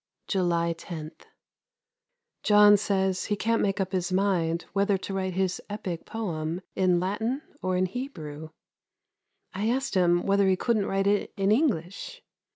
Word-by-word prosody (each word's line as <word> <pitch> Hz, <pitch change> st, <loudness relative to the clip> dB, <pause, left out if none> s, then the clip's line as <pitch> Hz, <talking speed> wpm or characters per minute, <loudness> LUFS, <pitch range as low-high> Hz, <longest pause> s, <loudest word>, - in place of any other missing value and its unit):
July 170 Hz, -3 st, +1 dB
10. 160 Hz, -2 st, -7 dB, 1.3 s
John 210 Hz, 0 st, +7 dB
says 190 Hz, -2 st, 0 dB
he 210 Hz, -, 0 dB
can't 225 Hz, +2 st, +1 dB
make 195 Hz, -1 st, 0 dB
up 190 Hz, -1 st, -1 dB
his 185 Hz, -1 st, -1 dB
mind 180 Hz, -4 st, +1 dB
whether 200 Hz, 0 st, +2 dB
to 195 Hz, -, -6 dB
write 190 Hz, -1 st, -2 dB
his 185 Hz, -1 st, 0 dB
epick 195 Hz, -5 st, -5 dB
poem 170 Hz, -6 st, -3 dB
in 180 Hz, -2 st, +3 dB
Latin 220 Hz, -, -2 dB, 0.2 s
or 185 Hz, -1 st, 0 dB
in 185 Hz, -, +2 dB
Hebrew. 160 Hz, -, -6 dB, 1.0 s
I 205 Hz, +4 st, -1 dB
asked 265 Hz, +3 st, -1 dB
him 175 Hz, -2 st, +3 dB
whether 200 Hz, 0 st, +3 dB
he 190 Hz, -, +4 dB
couldn't 215 Hz, +1 st, 0 dB
write 195 Hz, 0 st, 0 dB
it 205 Hz, +1 st, +1 dB
in 195 Hz, +1 st, +2 dB
English. 230 Hz, -, -1 dB
190 Hz, 150 wpm, -27 LUFS, 175-205 Hz, 1.3 s, John